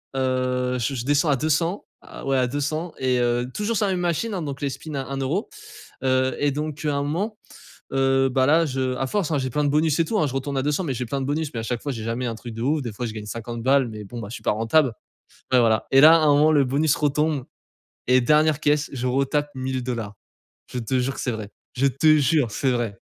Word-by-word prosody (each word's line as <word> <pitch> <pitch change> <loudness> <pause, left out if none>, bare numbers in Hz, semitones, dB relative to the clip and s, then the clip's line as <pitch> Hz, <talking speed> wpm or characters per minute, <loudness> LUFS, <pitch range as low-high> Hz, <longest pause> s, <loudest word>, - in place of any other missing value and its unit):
Heu, 130 -1 0
je 125 +4 -1
je 120 - -3
descends 145 +2 +2
à 140 - +4
200, 165 +7 0 0.2
à - - -11
ouais 135 -1 +1
à 125 -1 +2
200 155 +5 -3
et, 130 -1 +1
heu, 120 +1 0
toujours 210 +2 -1
sur 205 - +1
la - - 0
même 180 - -2
machine 175 +6 -1
hein, 180 - -2
donc 140 -3 -5
les 140 - 0
spin 155 +3 -8
à 135 - -2
1€. 135 - -2 0.5
Heu, 130 -1 +2
et 145 -1 +2
donc 150 +1 -4
à 145 -1 +1
un 140 - 0
moment, 200 +9 -2 0.6
heu 135 0 +3
bah 130 0 +2
là 165 +3 +4
je 130 -2 -1
à 135 - -1
force 190 -4 -1
hein 150 - +2
j'ai 130 -1 -2
plein 150 +4 -1
de 145 - +2
bonus 155 +1 +2
et - - +5
tout 215 +2 0
hein. 150 - +2
Je 130 - -5
retourne 135 +1 -3
à - - +1
200 150 +5 0
mais 140 -5 -2
j'ai 125 +1 -3
plein 135 +4 -3
de - - -2
bonus, 150 +2 -2
mais 115 - -3
à - - -6
chaque 120 0 -3
fois 145 - -3
j'ai 110 -3 -6
jamais 115 +3 -2
un 115 -2 -3
truc 115 0 -9
de 115 - -6
ouf. 145 +4 +1
Des 120 -4 -4
fois 120 +4 -5
je 110 - -5
gagne 105 -1 -7
50 115 +1 -6
balles, 135 -1 +3
mais 105 -1 -8
bon 120 +4 -8
bah, 105 - -6
je - - -8
suis - - -10
pas - - +2
rentable. 115 +5 +2 0.6
Ouais 130 - +6
voilà 110 -2 +3
et 135 - +6
là 155 +2 +9
à - - +5
un 155 -2 +4
moment 155 +2 +4
le 145 -2 +4
bonus 140 +3 +2
retombe, 150 -2 0 0.6
et 125 0 +5
dernière 150 +3 +3
caisse 150 0 +1
je 125 -2 -3
retape 140 +3 0
1000$. 125 -5 -3 0.6
Je 125 - -3
te 125 +3 -1
jure 130 +2 -2
c'est 125 - -1
vrai, 110 -2 -6 0.3
je 135 +2 +1
te 155 +4 +4
jure 145 -3 +2
c'est 130 +5 0
vrai. 115 -5 -2
135 Hz, 260 wpm, -23 LUFS, 125-150 Hz, 0.6 s, là